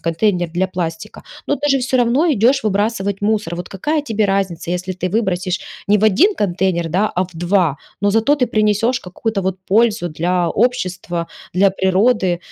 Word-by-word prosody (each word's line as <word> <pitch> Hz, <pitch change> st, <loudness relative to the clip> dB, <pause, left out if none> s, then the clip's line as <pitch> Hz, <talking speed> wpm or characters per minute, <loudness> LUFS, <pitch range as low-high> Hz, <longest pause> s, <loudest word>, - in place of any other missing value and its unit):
контейнер 175 Hz, +1 st, 0 dB
для 180 Hz, +3 st, 0 dB
пластика. 170 Hz, -3 st, -5 dB, 0.2 s
Но -, -, +1 dB
ты 290 Hz, +1 st, -2 dB
же 275 Hz, -, +4 dB
всё 260 Hz, 0 st, 0 dB
равно 250 Hz, +6 st, +2 dB
идешь 255 Hz, +3 st, +2 dB
выбрасывать 200 Hz, -1 st, 0 dB
мусор. 205 Hz, -4 st, 0 dB
Вот 175 Hz, -, -6 dB
какая 300 Hz, -, -1 dB
тебе 220 Hz, -6 st, -1 dB
разница, 195 Hz, -4 st, -1 dB
если 185 Hz, +1 st, -3 dB
ты 185 Hz, 0 st, -3 dB
выбросишь 185 Hz, -3 st, -1 dB, 0.3 s
не 205 Hz, -, +5 dB
в -, -, -3 dB
1 305 Hz, -, +4 dB
контейнер, 180 Hz, -, 0 dB
да, 190 Hz, +6 st, +1 dB
а 180 Hz, -, +1 dB
в 185 Hz, -, -6 dB
2, 175 Hz, -3 st, +1 dB, 0.3 s
но 205 Hz, -, +3 dB
зато 225 Hz, +7 st, +3 dB
ты 265 Hz, -4 st, 0 dB
принесешь 215 Hz, +3 st, +1 dB
какую-то 200 Hz, +2 st, -3 dB
вот 190 Hz, 0 st, -1 dB
пользу 215 Hz, -2 st, +2 dB
для 175 Hz, +2 st, 0 dB
общества, 185 Hz, -8 st, -1 dB, 0.3 s
для 195 Hz, +2 st, +5 dB
природы. 190 Hz, 0 st, +1 dB
195 Hz, 175 wpm, -18 LUFS, 180-225 Hz, 0.3 s, не